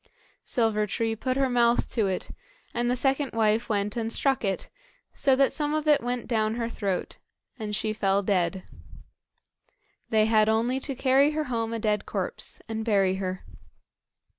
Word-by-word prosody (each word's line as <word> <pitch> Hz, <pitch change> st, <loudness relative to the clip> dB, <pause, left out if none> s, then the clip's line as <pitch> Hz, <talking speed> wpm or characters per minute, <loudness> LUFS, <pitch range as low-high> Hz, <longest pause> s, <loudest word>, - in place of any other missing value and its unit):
Silver 220 Hz, -4 st, +1 dB
tree 225 Hz, +2 st, -1 dB
put 255 Hz, +4 st, -2 dB
her 270 Hz, -1 st, +3 dB
mouth 240 Hz, -1 st, +2 dB
to 220 Hz, -4 st, +1 dB
it, 185 Hz, -1 st, -3 dB, 0.4 s
and 240 Hz, 0 st, 0 dB
the 250 Hz, -, +2 dB
second 270 Hz, +2 st, 0 dB
wife 225 Hz, +1 st, +1 dB
went 205 Hz, -1 st, -1 dB
and 225 Hz, -1 st, -2 dB
struck 270 Hz, +1 st, +1 dB
it 195 Hz, -2 st, -2 dB, 0.5 s
so 270 Hz, -2 st, +3 dB
that 275 Hz, +1 st, +3 dB
some 295 Hz, 0 st, -1 dB
of 310 Hz, 0 st, -2 dB
it 300 Hz, -1 st, +5 dB
went 245 Hz, 0 st, -3 dB
down 220 Hz, -2 st, 0 dB
her 230 Hz, -1 st, -2 dB
throat, 200 Hz, -5 st, -3 dB, 0.4 s
and 210 Hz, -1 st, -3 dB
she 215 Hz, +1 st, -1 dB
fell 200 Hz, -1 st, +1 dB
dead. 185 Hz, -2 st, 0 dB, 1.5 s
They 215 Hz, -1 st, +3 dB
had 215 Hz, -1 st, +3 dB
only 235 Hz, +4 st, +1 dB
to 275 Hz, 0 st, -4 dB
carry 265 Hz, +2 st, +4 dB
her 310 Hz, 0 st, -1 dB
home 230 Hz, -4 st, -2 dB
a 230 Hz, -, -2 dB
dead 210 Hz, -2 st, -1 dB
corpse -, -, -3 dB
and 220 Hz, 0 st, -3 dB
bury 195 Hz, -4 st, +2 dB
her. 185 Hz, -1 st, -4 dB
225 Hz, 170 wpm, -26 LUFS, 210-255 Hz, 1.5 s, it